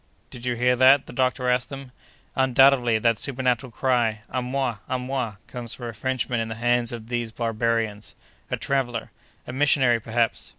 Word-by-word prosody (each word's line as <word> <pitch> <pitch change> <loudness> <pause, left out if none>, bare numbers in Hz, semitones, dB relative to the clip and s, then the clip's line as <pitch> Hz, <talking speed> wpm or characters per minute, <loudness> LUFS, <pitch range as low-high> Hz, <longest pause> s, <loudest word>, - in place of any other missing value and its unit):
"Did 125 0 -8
you 125 - 0
hear 125 +1 +2
that?" 130 +2 +6
the - - -11
doctor 130 -1 0
asked 125 0 +1
them. 135 -2 -8 0.4
"Undoubtedly, 130 -2 +4
that 115 0 +2
supernatural 130 -2 -1
cry, 115 -4 +1
'À 130 -1 -1
moi! 125 -2 -1
à 130 - -1
moi!' 125 -4 -3
comes 120 -2 -6
from 120 -2 -6
a - - -7
Frenchman 125 +1 -1
in 115 - -2
the 115 - -5
hands 120 +1 +1
of 115 -2 -7
these 120 -2 -2
barbarians!" 115 -2 -2 0.3
"A - - -1
traveller." 125 -4 -2 0.3
"A - - -7
missionary, 130 -3 +3
perhaps." 115 +1 -1
125 Hz, 175 wpm, -24 LUFS, 115-130 Hz, 0.4 s, that